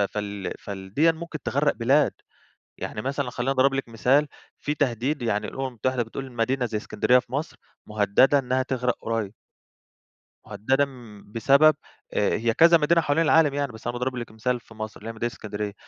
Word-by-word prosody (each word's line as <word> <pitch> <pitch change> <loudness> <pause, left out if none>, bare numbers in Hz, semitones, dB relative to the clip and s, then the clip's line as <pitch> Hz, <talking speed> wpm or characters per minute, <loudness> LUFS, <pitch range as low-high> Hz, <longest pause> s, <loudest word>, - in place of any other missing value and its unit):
فال 100 -1 -3
فال 95 -1 -8
ديًّا 165 +5 +4
ممكن 165 -1 -7
تغرق 145 +2 +1
بلاد. 135 +5 +3 0.7
يعني 105 - -5
مثلًا 135 +1 -2
خليني 125 +2 -2
أضرب 135 0 +3
لِك 135 -3 -3
مثال، 130 +6 +2 0.3
في 150 - -2
تهديد 135 +1 -1
يعني 105 -3 -1
الأمم 135 0 -4
المتحدة 130 0 -1
بتقول 130 +3 -7
مدينة 125 +2 0
زي 110 -2 -2
إسكندرية 110 +4 +2
في 125 - -12
مصر، 145 +5 -3 0.3
مهددة 105 +7 +3
إنها 130 0 0
تغرق 125 -1 -1
قريب. 110 -3 -2 1.1
مهددة 135 +6 +1 0.4
بسبب 140 +8 +4 0.4
هي 115 +3 +1
كذا 170 +6 +6
مدينة 165 +2 +3
حوالين 155 +2 +1
العالم 155 -2 +4
يعني 140 -1 -2
بس 110 +1 -9
أنا 120 - -1
باضرب 125 +1 -2
لِك 120 -2 -6
مثال 120 +3 -2
في 115 - -17
مصر 110 -1 -7
اللي 110 - -7
هي - - -5
مدينة 120 +2 -3
إسكندرية 105 -1 -5
125 Hz, 175 wpm, -25 LUFS, 110-140 Hz, 1.1 s, كذا